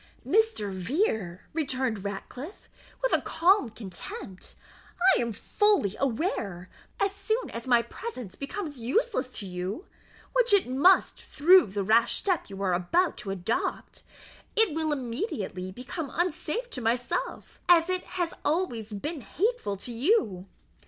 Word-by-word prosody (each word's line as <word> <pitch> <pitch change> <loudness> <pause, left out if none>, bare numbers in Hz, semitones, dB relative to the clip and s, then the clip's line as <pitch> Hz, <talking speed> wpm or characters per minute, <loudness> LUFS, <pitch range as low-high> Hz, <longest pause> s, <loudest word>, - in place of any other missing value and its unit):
"Mr. 440 - +2
Vere," 190 - -1
returned 260 -9 -1
Ratcliffe, 245 - -7 0.4
with - - +2
calm 350 - +3
contempt, 190 -3 -7 0.6
"I - - +1
am 235 -1 -1
fully 225 - +2
aware, 220 - -2 0.3
that - - +2
as 395 0 -3
soon 440 +4 -1
as 230 +2 -6
my 240 -2 +5
presence 250 - -7
becomes 290 - -5
useless 265 - 0
to 205 - -6
you, 185 - -4 0.5
which - - +3
it 400 -8 +5
must 285 +10 +4
through 355 +5 +5
the 200 +1 -2
rash 230 +4 +4
step 370 - 0
you 195 -1 -8
are 185 -2 +2
about 320 - +2
to 195 - -6
adopt, 195 +3 -2 0.5
it 440 -7 +4
will 315 0 0
immediately 230 - -3
become 260 - -6
unsafe 370 +8 -1
to 255 - -5
myself, 240 +2 -2
as 335 -1 +7
it 370 0 0 0.2
has 350 -1 0
always 265 - -1
been 295 +9 -4
hateful 305 - -1
to 240 - -7
you. 230 - +1
255 Hz, 140 wpm, -28 LUFS, -, 0.6 s, as